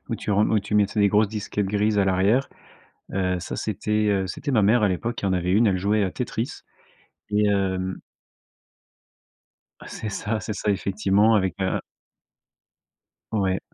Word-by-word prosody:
où - - -2
tu - - -5
ren 105 +1 +3
où 110 - +3
tu 105 +1 -5
mettais 105 +1 +2
des 100 - +5
grosses 105 +1 +3
disquettes 105 -1 -3
grises 105 +1 +1
à 100 - +4
l'arrière. 95 +8 +2 0.6
Heu, 90 -1 0
ça, - - -5
c'était, 105 +1 -1
heu, 95 -1 +1
c'était 145 +7 -4
ma 110 -4 +3
mère, 110 +3 +4
à 105 - +4
l'époque, 115 +6 -2
qui 100 - -3
en 95 - +1
avait 90 0 0
1, 110 +3 +4
elle 95 -2 +2
jouait 105 +2 +1
à 95 - -1
Tetris. 120 -1 -4 0.7
Et, 105 0 +2
hem 95 -2 -1 1.9
C'est 110 - -6
ça, 105 +2 -3
c'est 105 0 -4
ça, 105 0 -1
effectivement, 100 +2 +2
avec 95 -4 +1
un 95 - 0 1.5
Ouais. 95 -3 +1
105 Hz, 170 wpm, -24 LUFS, 95-110 Hz, 1.9 s, des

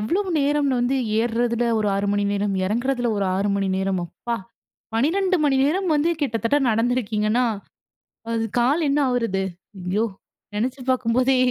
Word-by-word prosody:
எவ்வளவு 370 - 0
நேரம்னு 280 -2 +1
வந்து 245 +3 +1 0.2
ஏறுறதில 235 0 0
ஒரு 210 - +1
6 200 +1 0
மணி 205 0 +1
நேரம், 200 0 0
இறங்குறதில 245 +4 0
ஒரு 200 - 0
6 200 +2 0
மணி 195 -1 0
நேரம், 190 -1 0
அப்பா! 235 +7 -4 0.6
12 370 +10 +2
மணி 280 -2 +3
நேரம் 365 +6 +1
வந்து 300 +3 +2
கிட்டத்தட்ட 235 0 +1
நடந்திருக்கீங்கன்னா, 225 0 +1 0.9
அது 225 -1 0 0.2
கால் 270 +8 +2
என்ன 285 +1 +2
ஆவுறது? 230 -6 0 0.4
ஐயோ 205 +5 +1 0.5
நினைச்சு 250 +5 -2
பார்க்கும்போதே 255 +1 +2
240 Hz, 140 wpm, -23 LUFS, 215-270 Hz, 0.9 s, மணி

